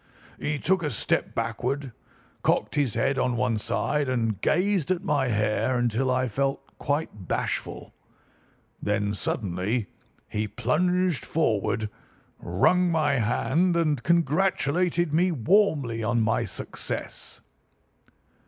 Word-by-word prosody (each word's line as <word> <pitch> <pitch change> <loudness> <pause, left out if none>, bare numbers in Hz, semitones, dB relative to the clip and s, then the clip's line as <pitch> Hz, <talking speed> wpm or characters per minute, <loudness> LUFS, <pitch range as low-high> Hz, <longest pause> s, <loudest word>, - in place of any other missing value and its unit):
He 150 0 -1
took 190 +6 +1
a 150 - -1
step 115 - -1
backward, 135 +1 -2 0.5
cocked - - +1
his 140 -7 0
head 135 0 +1
on 125 -1 +1
one 120 -3 +1
side, 135 +5 -1
and 115 -5 -1
gazed 185 -2 +1
at 185 0 0
my 145 -8 +1
hair 110 +3 +1
until 120 +2 +1
I 130 0 +1
felt 135 +4 -2
quite 145 - -2
bashful. - - -3 0.9
Then 105 0 0
suddenly 100 +2 -2 0.4
he 105 0 -2
plunged 160 - +1
forward, 110 -7 0 0.5
wrung 180 - +2
my 145 -5 +2
hand, 135 +10 +1
and 155 -6 +1
congratulated 170 +1 +1
me 180 +3 +3
warmly 140 - +2
on 120 +2 +1
my 110 0 +1
success. - - -6
135 Hz, 115 wpm, -26 LUFS, 115-165 Hz, 0.9 s, me